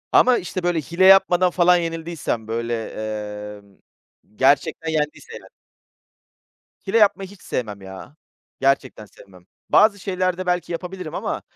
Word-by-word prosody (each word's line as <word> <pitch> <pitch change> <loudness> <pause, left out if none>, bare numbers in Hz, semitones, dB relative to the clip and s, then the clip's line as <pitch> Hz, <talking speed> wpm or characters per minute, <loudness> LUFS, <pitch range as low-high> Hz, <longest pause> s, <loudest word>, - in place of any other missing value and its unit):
Ama, 250 -1 +5
işte, 185 0 -5
böyle 175 -2 +1
hile 170 +5 0
yapmadan 190 -1 +6
falan 180 0 +4
yenildiysem 165 -8 -4
böyle, 115 0 -3 0.7
ımm, 100 -1 -24 0.5
gerçekten 145 +6 +1
yendiyse 150 - -3
yani - - -11 1.4
Hile 205 +4 +2
yapmayı 200 -3 +3
hiç 200 -2 -16
sevmem 105 -5 -5
ya. 95 +9 -11 0.4
Gerçekten 135 -5 0
sevmem. 95 -3 -19 0.2
Bazı 210 -1 +4
şeylerde 185 -1 -2
belki 180 -1 -1
yapabilirim 180 -1 -6
ama - - -3
170 Hz, 125 wpm, -21 LUFS, 130-185 Hz, 1.4 s, yapmadan